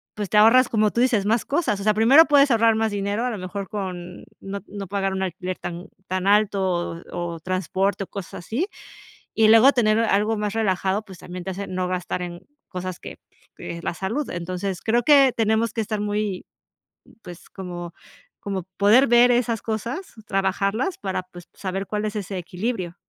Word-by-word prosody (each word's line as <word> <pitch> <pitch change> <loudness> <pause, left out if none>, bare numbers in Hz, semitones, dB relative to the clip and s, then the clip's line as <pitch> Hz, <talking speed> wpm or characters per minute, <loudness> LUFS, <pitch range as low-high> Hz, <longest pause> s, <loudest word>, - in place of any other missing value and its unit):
pues 205 -3 -4
te - - -2
ahorras, 235 +4 +6
como 215 -2 +2
tú 235 - -2
dices, 240 -6 +2
más 225 +2 +1
cosas, 275 - 0
o - - -5
sea, 215 0 +3
primero 265 +9 +7
puedes 285 -2 +5
ahorrar 225 -1 +4
más 220 -1 0
dinero, 205 +3 -2
a 250 - -1
lo 215 - -4
mejor 190 +2 -6
con 185 -4 -6 0.2
no 200 +1 -5
no 200 -2 -7
pagar 195 0 -1
un 190 0 -2
alquiler 185 0 -4
tan 175 +1 -6 0.2
tan 185 +1 -2
alto 205 -1 +3 0.5
o 175 -1 -4
o - - -9
transporte 190 +3 -1
o - - -29
cosas 195 -4 -8
así, 295 - -1 0.7
y 220 -1 +4
luego 225 +5 +7
tener 215 -3 +2
algo 215 0 +2
más 210 0 -2
relajado, 195 -1 0
pues 190 -4 -12
también 180 0 -8
te - - -4
hace 195 +2 -5
no 185 0 -2
gastar 180 0 -3
en 175 0 -6 0.3
cosas 185 0 -5
que - - -9 0.4
que 170 - -7
la - - -2
salud, 230 +11 -3
entonces, 180 +2 -4
creo 235 +2 +2
que 275 -4 +6
tenemos 220 0 +1
que 225 - -2
estar 215 0 -3
muy 205 -2 -2 0.8
pues 175 -1 -12
como 175 -3 -7 0.5
como 195 -2 -3 0.2
poder 220 +7 +6
ver 240 +1 +6
esas 235 -2 0
cosas, 235 - -4
trabajarlas 195 - 0
para 190 -2 -3
pues, 175 -2 -14
saber 195 0 -4
cuál 210 0 -2
es 210 - -4
ese 195 -1 -4
equilibrio. 180 0 -4
200 Hz, 190 wpm, -23 LUFS, 185-225 Hz, 0.8 s, primero